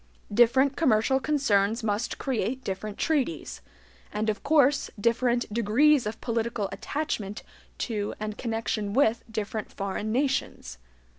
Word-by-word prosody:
Different 260 +5 +4
commercial 265 -3 +3
concerns 230 -7 +1
must 215 +2 -1
create 260 0 -2
different 200 +2 -4
interests, 275 - -1 0.5
and 215 +1 0
of 210 - -8
course 285 -2 +3
different 240 +2 +2
degrees 235 +4 +3
of 220 +1 -5
political 230 -3 -1
attachment 210 -2 -3 0.3
to 210 -3 -2
and 215 0 -4
connection 225 -3 -2
with 235 -3 +3
different 215 -1 -4
foreign 200 +2 -3
nations. 260 - -1
230 Hz, 120 wpm, -27 LUFS, 210-265 Hz, 0.5 s, Different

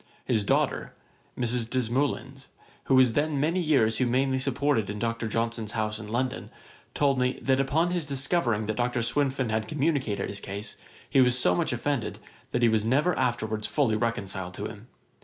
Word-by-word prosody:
His 110 -4 +1
daughter, - - 0 0.4
Mrs. 120 -1 -1
Desmoulins, 130 +2 -1 0.4
who 135 - +3
was 130 -3 +5
many 155 +4 +1
years 125 -9 +2
humanely 130 +2 +1
supported 130 -5 0
in 105 - -4
Dr. 115 +1 -2
Johnson's 115 -1 -2
house 110 -1 -1
in 110 - -8
London, 125 +4 -2 0.5
told 140 -2 +2
me, 125 0 +1
that 130 0 +2
upon 155 +6 +1
his 175 -5 -1
discovering 135 -5 0
that 110 0 -3
Dr. 120 -1 0
Swinfen 130 0 0
had 110 0 -1
communicated 140 -8 0
his 100 - -4
case, 100 +2 -6 0.3
he 135 - +4
was 125 -1 +4
so 90 -8 +3
much - - 0
offended, - - -2 0.3
that 120 - 0
he - - +7
was 110 -2 +2
never 145 +10 +2
afterwards 110 -4 -1
fully 130 -8 +1
reconciled 95 -5 -2
to 105 - -5
him. 105 +2 -8
125 Hz, 170 wpm, -27 LUFS, 110-135 Hz, 0.5 s, he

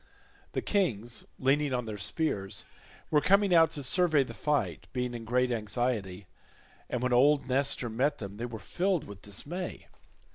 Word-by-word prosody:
The - - -2
kings, 120 - 0
leaning 140 +1 +2
on 125 -1 -2
their 105 -2 -6
spears, 100 - -2 0.5
were 150 -1 +4
coming 195 +1 +4
out 165 -2 +6
to 145 - -4
survey 155 +1 +3
the 130 - -9
fight, 150 -1 -1
being 125 -1 -2
in 115 -1 -6
great 125 +2 +1
anxiety, 105 -4 -1 0.6
and 125 0 -2
when 125 0 +1
old 140 +3 +4
Nestor 130 -1 +1
met 130 +6 0
them 100 -1 -7
they 120 +2 -3
were 115 -2 -6
filled 180 - -1
with 100 -1 -11
dismay. 160 - -6
125 Hz, 160 wpm, -30 LUFS, 110-150 Hz, 0.6 s, out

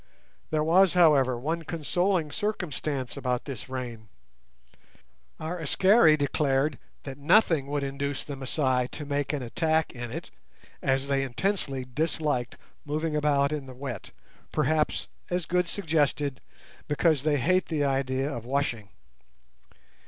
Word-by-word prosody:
There 155 -1 +1
was, 180 +3 +4
however, 140 -8 +5
one 160 +7 -2
consoling 165 +1 0
circumstance 155 - -3
about 125 -3 -2
this 130 -4 -7
rain; 120 -5 -6 1.3
our 165 +3 -4
Askari 165 - +5
declared 140 -1 +1 0.2
that 135 -1 -7
nothing 150 -2 +4
would 145 0 -1
induce 140 0 -3
the 145 - -6
Masai 130 -2 0
to 150 +3 -7
make 145 -1 -1
an 145 -4 -2
attack 160 +7 +1
in 120 -1 -6
it, - - -6 0.5
as 135 0 +1
they 140 -1 +1
intensely 135 -1 -1
disliked 145 -2 -1 0.3
moving 155 +1 -2
about 145 -1 +2
in 145 -3 -3
the 130 - -10
wet, 125 -6 -6 0.4
perhaps, 155 +2 +1 0.2
as 180 -1 -1
Good 180 0 +1
suggested, 150 -6 0 0.5
because 150 0 +2
they 150 0 +2
hate 185 +8 +2
the 155 -3 0
idea 135 -1 0
of 120 -6 -4
washing. 120 -5 -1
145 Hz, 130 wpm, -27 LUFS, 135-160 Hz, 1.3 s, however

